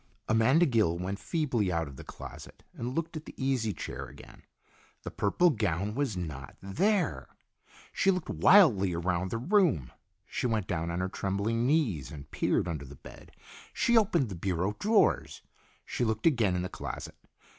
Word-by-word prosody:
Amanda 125 Hz, +10 st, +4 dB
Gill 110 Hz, -, +2 dB
went 95 Hz, +3 st, -4 dB
feebly 125 Hz, -, 0 dB
out 85 Hz, -2 st, -1 dB
of 70 Hz, -, -10 dB
the -, -, -10 dB
closet -, -, -11 dB
and 125 Hz, +3 st, -5 dB
looked 165 Hz, 0 st, -3 dB
at 155 Hz, -, -6 dB
the -, -, -11 dB
easy 130 Hz, -5 st, 0 dB
chair 70 Hz, -6 st, -6 dB
again. 70 Hz, +3 st, -14 dB, 0.6 s
The -, -, -6 dB
purple 170 Hz, -, +2 dB
gown 100 Hz, -, -1 dB
was 130 Hz, -6 st, -1 dB
not 75 Hz, -6 st, -6 dB
there! 180 Hz, -, 0 dB, 0.7 s
She 195 Hz, -, +2 dB
looked 185 Hz, -3 st, +1 dB
wildly 115 Hz, -, +5 dB
around 90 Hz, +2 st, -1 dB
the 115 Hz, -, -2 dB
room. 145 Hz, -, +2 dB, 0.3 s
She -, -, -2 dB
went 110 Hz, -4 st, 0 dB
down 85 Hz, -3 st, -2 dB
on 85 Hz, +1 st, -2 dB
her 95 Hz, -, 0 dB
trembling 105 Hz, +5 st, -1 dB
knees 120 Hz, -, +1 dB
and 75 Hz, -1 st, -10 dB
peered -, -, +1 dB
under 75 Hz, -4 st, -4 dB
the 70 Hz, +2 st, -11 dB
bed, -, -, -14 dB, 0.4 s
she 235 Hz, -, +2 dB
opened 185 Hz, -, +3 dB
the 95 Hz, -, -5 dB
bureau 95 Hz, +3 st, -1 dB
drawers, 215 Hz, 0 st, +2 dB, 0.4 s
she -, -, -2 dB
looked 110 Hz, -1 st, -1 dB
again 115 Hz, -, +3 dB
in 90 Hz, -, -1 dB
the -, -, -2 dB
closet. -, -, -6 dB
105 Hz, 170 wpm, -29 LUFS, 90-145 Hz, 0.7 s, wildly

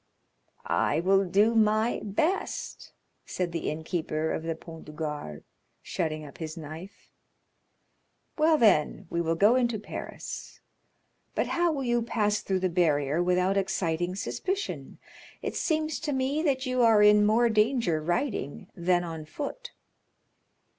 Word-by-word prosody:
"I 150 Hz, -, +1 dB
will 195 Hz, +3 st, +3 dB
do 205 Hz, +5 st, +3 dB
my 220 Hz, +1 st, +2 dB
best," 310 Hz, -, -2 dB, 0.3 s
said 180 Hz, -2 st, -3 dB
the 165 Hz, -1 st, -2 dB
innkeeper 160 Hz, 0 st, -2 dB
of -, -, -2 dB
the 165 Hz, 0 st, -3 dB
Pont 165 Hz, 0 st, -11 dB
du 150 Hz, -, -10 dB
Gard, 150 Hz, -, -5 dB, 0.4 s
shutting 155 Hz, -3 st, -3 dB
up 140 Hz, -, -13 dB
his 160 Hz, -1 st, -5 dB
knife. 160 Hz, +5 st, -10 dB, 1.2 s
"Well, 315 Hz, 0 st, +4 dB
then, 200 Hz, -, +3 dB
we 170 Hz, -, 0 dB
will 165 Hz, 0 st, 0 dB
go 205 Hz, +7 st, +5 dB
into 240 Hz, -3 st, +1 dB
Paris. 210 Hz, -, -7 dB, 0.8 s
But -, -, 0 dB
how 345 Hz, -1 st, +2 dB
will 280 Hz, -3 st, -2 dB
you 240 Hz, -1 st, +1 dB
pass 210 Hz, -2 st, 0 dB
through 190 Hz, -1 st, -1 dB
the 185 Hz, -, +2 dB
barrier 155 Hz, -3 st, +1 dB
without 180 Hz, +2 st, +2 dB
exciting 180 Hz, -2 st, -1 dB
suspicion? 200 Hz, -, -4 dB, 0.5 s
It -, -, -3 dB
seems 315 Hz, -1 st, 0 dB
to 300 Hz, -2 st, -2 dB
me 265 Hz, +3 st, 0 dB
that 275 Hz, -4 st, 0 dB
you 255 Hz, -1 st, 0 dB
are 225 Hz, -3 st, +6 dB
in 210 Hz, 0 st, +6 dB
more 225 Hz, +3 st, +4 dB
danger 220 Hz, -, +2 dB
riding 175 Hz, -, -2 dB
than 175 Hz, 0 st, +1 dB
on 165 Hz, -2 st, -6 dB
foot." 485 Hz, -, -6 dB
195 Hz, 140 wpm, -28 LUFS, 165-240 Hz, 1.2 s, are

